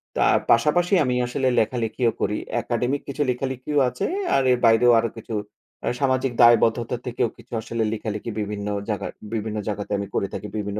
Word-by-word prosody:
তার - - +4
পাশাপাশি 160 - +3
আমি 125 -1 0
আসলে 130 +1 -1
লেখালেখিও 115 +1 0
করি। 105 +2 0 0.3
একাডেমিক 125 +4 -1
কিছু 140 +1 -4
লেখালেখিও 130 +3 -1
আছে - - -3 0.3
আর 135 - +3
এর 125 - +4
বাইরেও 115 +2 +6
আরো 115 - 0
কিছু 115 0 -8 0.5
আ - - -2
সামাজিক 130 -1 +1
দায়বদ্ধতা 120 0 +4
থেকেও 120 -1 0
কিছু - - -15
আসলে 115 0 -2
লেখালেখি 105 0 -4
বিভিন্ন 105 0 -4 0.2
জায়গা 105 - -2 0.3
বিভিন্ন 110 -1 -3
জায়গাতে 105 -1 -4
আমি 100 - -4
করে 100 - +1
থাকি 100 +2 -5
বিভিন্ন 105 0 -3
115 Hz, 165 wpm, -23 LUFS, 105-130 Hz, 0.5 s, বাইরেও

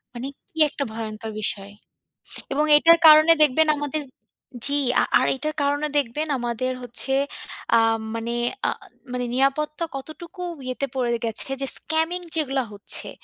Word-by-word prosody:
মানে 250 +3 -5 0.2
কি 320 - -21
একটা 280 - -4
ভয়ঙ্কর 220 -1 -6
বিষয়! 200 -1 -3 0.8
এবং 300 +2 +1
এটার 335 +2 +6
কারণে 310 +1 +8
দেখবেন 305 +2 +4
আমাদের 290 +1 -3 0.6
জি, 285 +1 +1 0.4
আর - - +1
এটার 305 +3 -3
কারণে 290 +1 0
দেখবেন 285 +4 -2
আমাদের 240 +2 -2
হচ্ছে 245 +2 0 0.6
আ - - +6 0.4
মানে 230 +1 -3 0.3
আ - - +2 0.4
মানে 250 0 -2
নিরাপত্তা 300 +5 0
কতটুকু 335 +6 -9 0.2
ইয়েতে 255 +2 -3
পড়ে 240 -2 0
গেছে 225 +4 0
যে 270 - -1
scamming 325 +3 -1
যেগুলা 270 -4 -1
হচ্ছে। 200 0 0
275 Hz, 135 wpm, -23 LUFS, 240-310 Hz, 0.8 s, কারণে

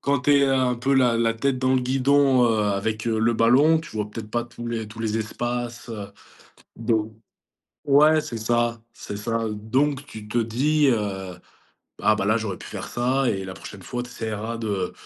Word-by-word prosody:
Quand 140 -2 +1
tu 145 +2 +4
es 140 - +4
un 130 -2 +2
peu 135 +3 0
la 125 -3 +4
la 115 -1 +1
tête 130 +3 0
dans 130 0 +2
le 130 - +3
guidon, 135 0 +3
heu, 115 -1 +2
avec 105 +2 -1
le 115 0 +2
ballon, 135 +8 +5
tu 160 - -9
vois 105 -1 -2
peut-être 105 -1 -8
pas 120 0 -1
tous 120 0 -9
les 115 -2 -3
tous 110 +2 -10
les 110 0 -1
espaces, 120 +2 -4
heu, 105 -3 -6 0.7
donc 110 -1 -1 0.7
ouais, 150 +2 +5
c'est 120 - -6
ça, 120 +1 0
c'est 100 - -7
ça. 115 +2 -2
Donc, 135 +7 -1
tu 105 -1 -10
te 120 - 0
dis, 140 +6 +2
heu: 95 -5 -2 0.6
«Bah 110 0 +3
bah 95 - -1
là, 110 +2 +3
j'aurais 110 -4 -3
pu - - -10
faire - - -6
ça 130 +2 0
et 95 -1 -3
la 95 0 -7
prochaine 100 0 -10
fois, 120 +6 -4
tu 125 - -9
essaieras 110 0 -4
de 100 -5 -2
115 Hz, 200 wpm, -24 LUFS, 110-130 Hz, 0.7 s, ballon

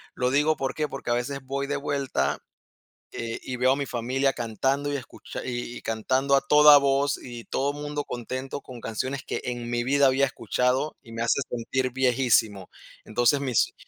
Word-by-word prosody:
Lo 125 0 0
digo, 150 +3 +3
¿por 135 -1 -2
qué? 150 -1 -1
Porque 135 -3 -5
a - - +4
veces 135 +3 -2
voy 140 +1 -3
de 145 - -1
vuelta, 140 - -1 0.7
eh, 115 -1 -4
y 125 - -5
veo 130 +1 +3
a - - +1
mi 140 - -2
familia 130 +3 0
cantando, 135 +5 -1
y - - 0
escucha 130 - -8
y 120 -1 -5
cantando 130 +5 +1
a 135 - +6
toda 150 +1 +8
voz, 140 0 +1
y 120 -2 -8
todo 140 +2 -1
mundo 145 0 -4
contento, 130 +3 -5
con 125 -2 -10
canciones 130 +5 -3
que - - -4
en 120 -1 -4
mi 120 0 0
vida 140 +1 +4
había 135 +1 +4
escuchado, 130 +3 0
y 115 - -14
me 115 - -5
hace 115 +4 +2
sentir 125 +2 -1
viejísimo. 120 -6 +2 0.3
Entonces, 120 +6 +2
mis 130 -5 +1
130 Hz, 185 wpm, -26 LUFS, 120-140 Hz, 0.7 s, toda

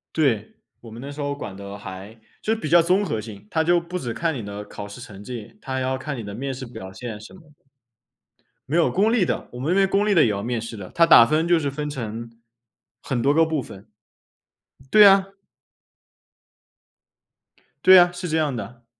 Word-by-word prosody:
对， 120 -9 0 0.3
我 115 -2 -12
们 115 - -9
那 140 - -7
时 145 +1 -8
候 145 0 -2
管 100 -9 -8
的 100 0 -8
还 100 +2 -9 0.2
就 220 - 0
比 215 -9 -5
较 170 +2 +6
综 185 +5 +2
合 110 - -2
性。 105 -2 -10
它 160 0 +1
就 175 +1 +3
不 175 +2 -5
止 120 -7 -5
看 165 -1 -1
你 120 -7 -6
的 100 0 -7
考 105 0 -8
试 100 +4 -11
成 105 -5 -11
绩， 120 - -8
它 135 -9 -6
还 130 - -1
要 130 0 -1
看 140 +2 -5
你 120 - -6
的 100 -1 -7
面 135 +4 -4
试 130 - -7
表 95 -6 -9
现 110 -1 -7
什 110 - -13
么 185 - -15
的。 150 -2 -22 1.1
没 155 - 0
有， 170 - +3
公 210 +4 +2
立 205 -8 +2
的， - - -3
我 125 - -8
们 140 - -3
那 - - +3
边 195 0 +3
公 200 +2 +1
立 205 - +3
的 165 - +6
也 115 - +2
要 100 -1 -2
面 120 0 -2
试 115 0 -7
的， 95 -3 -9
它 170 - +5
打 120 -8 +8
分 155 +2 +1
就 175 -1 +4
是 145 -3 -2
分 150 +2 -4
成 115 -3 -6 0.7
很 125 -3 -2
多 140 +4 +2
个 165 - +5
部 160 -4 -2
分。 100 0 -12 1.0
对 210 -1 +8
啊。 195 -1 +6 2.6
对 185 0 +9
啊， 175 0 +6
是 175 0 -5
这 160 - +1
样 150 -5 0
的。 115 +3 -8
135 Hz, 240 characters per minute, -23 LUFS, 110-170 Hz, 2.6 s, 对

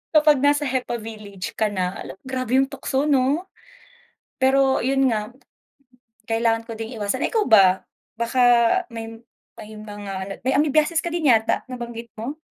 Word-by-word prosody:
Kapag 300 -2 +5
nasa 290 +1 +3
hepa 255 -3 -2
village 210 -5 -8
ka 215 - +3
na, 185 -2 -3
ala, - - -7
grabe 255 -2 -2
yung 270 0 +3
tukso 270 +1 -2
'no. 285 +3 +2 1.0
Pero 265 0 +3
yun 270 0 +2
nga, 215 -1 -2 1.0
kailangan 225 0 +1
ko - - -5
ding 225 +2 -6
iwasan. 205 -1 -2
Ikaw 440 -3 +1
ba, 190 -4 +5 0.3
baka 235 +2 -1 0.5
may 225 0 -7 0.4
may 215 - -11
mga 205 -2 -8
ano, 195 +1 -5
may 260 - +1
amoebiasis 305 +3 +2
ka 345 - -4
din 330 -6 +2
yata 220 0 +1
nabanggit 235 -2 -7
mo? 275 +7 -5
240 Hz, 155 wpm, -22 LUFS, 220-270 Hz, 1.0 s, Kapag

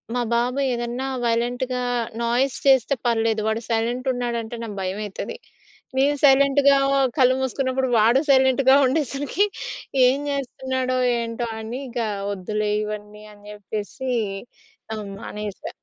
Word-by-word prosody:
మా 245 - +1
బాబు 250 +3 0
ఏదన్నా 240 +2 -3 0.2
వైలెంట్‌గా, 245 +2 -1 0.4
నాయిస్ 245 +3 +1
చేస్తే 265 0 +5
పర్లేదు. 225 -2 +1
వాడు 220 +1 -1
సైలెంటున్నాడంటే 240 0 -1
నాకు 210 -3 -6
భయమైతది. 205 - -4 0.6
నేను 280 +2 +3
సైలెంట్‌గా 280 0 +5 0.4
కళ్ళు 255 -1 +5
మూసుకున్నప్పుడు, 260 0 -1
వాడు 230 +5 +5
సైలెంట్‌గా 265 0 +5
ఉండేసరికి 285 - 0 0.6
ఏం 260 +2 +2
చేస్తున్నాడో? 260 -1 -2 0.2
ఏంటో? 230 +1 -3
అని 230 +4 -5
ఇగ 240 0 -4 0.3
వద్దులే 210 +2 -2
ఇవన్నీ 210 0 -7
అని 205 0 -19
చెప్పేసి 210 +5 -5 0.9
ఆహ్, 215 -1 -6
మానేసా. 210 -3 -6
245 Hz, 110 wpm, -23 LUFS, 220-265 Hz, 0.9 s, చేస్తే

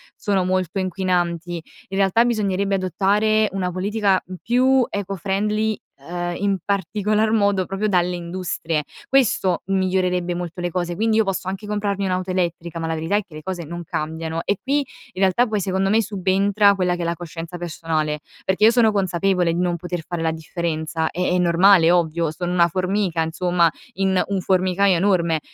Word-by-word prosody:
sono 195 -3 0
molto 185 0 -1
inquinanti. 175 -2 -1 0.3
In 195 - -4
realtà 195 +4 +4
bisognerebbe 200 -4 0
adottare 210 +3 +2
una 180 -2 -1
politica, 195 +1 +1
mhmm, 185 - -8
più 255 +1 +3
eco-friendly 205 +2 -1 0.2
ehm, 175 +4 -4
in 200 -1 0
particolar 210 +3 0
modo 200 -4 +2
proprio 195 +2 -2
dalle 180 -1 +1
industrie. 170 -3 -3 0.3
Questo 210 -9 +2
migliorerebbe 185 -2 0
molto 175 0 -5
le 175 - -1
cose, 175 -1 -2
quindi 220 +2 +1
io 220 - +5
posso 195 -2 -3
anche 195 +2 -4
comprarmi 200 -1 -1
un'auto 185 0 -1
elettrica, 170 -2 -2
ma 165 - -3
la 165 - -1
verità 160 +5 -1
è 210 - -1
che 165 - -20
le 155 - -7
cose 180 -2 -4
non 170 +2 -6
cambiano 160 +1 -3
e 200 - +1
qui, 280 +2 0
in 250 -6 -8
realtà 195 +6 +3
poi 215 -2 -1
secondo 190 0 0
me 225 +2 +4
subentra 200 0 +2
quella 180 -2 +1
che 175 - -5
è - - -1
la 170 0 -1
coscienza 170 +1 -7
personale, 160 -3 -2 0.3
perché 190 +3 +3
io 225 - +7
sono 230 -3 +4
consapevole 185 -2 +1
di 170 - -2
non 180 -1 +1
poter 175 -1 -5
fare 175 -2 -3
la 160 0 +1
differenza 160 0 -3
è - - -8
è 180 - +2
normale, 175 0 +5
è 175 - +5
ovvio, 165 -2 +1
sono 175 +2 -4
una 175 -1 +4
formica 185 -1 -1
insomma, 175 +1 +2 0.2
in 190 -1 +1
un 195 -1 -1
formicaio 185 +1 +2
enorme. 170 -3 +2
185 Hz, 180 wpm, -22 LUFS, 170-200 Hz, 0.3 s, io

